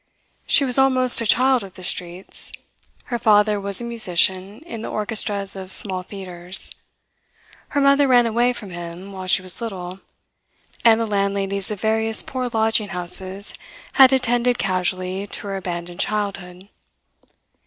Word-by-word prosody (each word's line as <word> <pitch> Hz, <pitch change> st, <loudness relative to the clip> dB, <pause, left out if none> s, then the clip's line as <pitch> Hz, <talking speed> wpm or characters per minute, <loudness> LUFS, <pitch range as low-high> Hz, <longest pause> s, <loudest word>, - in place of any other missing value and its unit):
She 280 Hz, -, +5 dB
was 255 Hz, 0 st, +2 dB
almost 255 Hz, -2 st, +4 dB
a 230 Hz, -, -1 dB
child 255 Hz, +1 st, +4 dB
of 195 Hz, -2 st, -11 dB
the 185 Hz, -, -10 dB
streets. 180 Hz, +1 st, -1 dB, 0.6 s
Her 240 Hz, -, 0 dB
father 210 Hz, -2 st, +3 dB
was 200 Hz, 0 st, -3 dB
a -, -, -5 dB
musician 195 Hz, -, 0 dB
in 230 Hz, -10 st, -7 dB
the -, -, -5 dB
orchestras 205 Hz, -2 st, -3 dB
of 190 Hz, -1 st, -8 dB
small 190 Hz, -2 st, -3 dB
theatres. 180 Hz, -1 st, 0 dB, 0.9 s
Her 285 Hz, -, -1 dB
mother 275 Hz, 0 st, +4 dB
ran 245 Hz, -2 st, +5 dB
away 235 Hz, +2 st, +2 dB
from 210 Hz, -6 st, -8 dB
him 175 Hz, +2 st, -8 dB
while 190 Hz, -1 st, -7 dB
she 185 Hz, -, +3 dB
was 185 Hz, +4 st, -6 dB
little, 185 Hz, -5 st, -6 dB, 0.8 s
and 225 Hz, -1 st, +6 dB
the 230 Hz, -, 0 dB
landladies 200 Hz, -1 st, -1 dB
of 210 Hz, -3 st, -5 dB
various 220 Hz, 0 st, +2 dB
poor 255 Hz, -2 st, -4 dB
lodging 220 Hz, -1 st, +1 dB
houses 185 Hz, +2 st, -2 dB, 0.4 s
had 265 Hz, -1 st, +7 dB
attended 245 Hz, -1 st, +2 dB
casually 185 Hz, 0 st, -2 dB
to 205 Hz, -, -7 dB
her 195 Hz, -, -3 dB
abandoned 175 Hz, -1 st, -6 dB
childhood. 195 Hz, -3 st, -3 dB
200 Hz, 150 wpm, -21 LUFS, 185-235 Hz, 0.9 s, had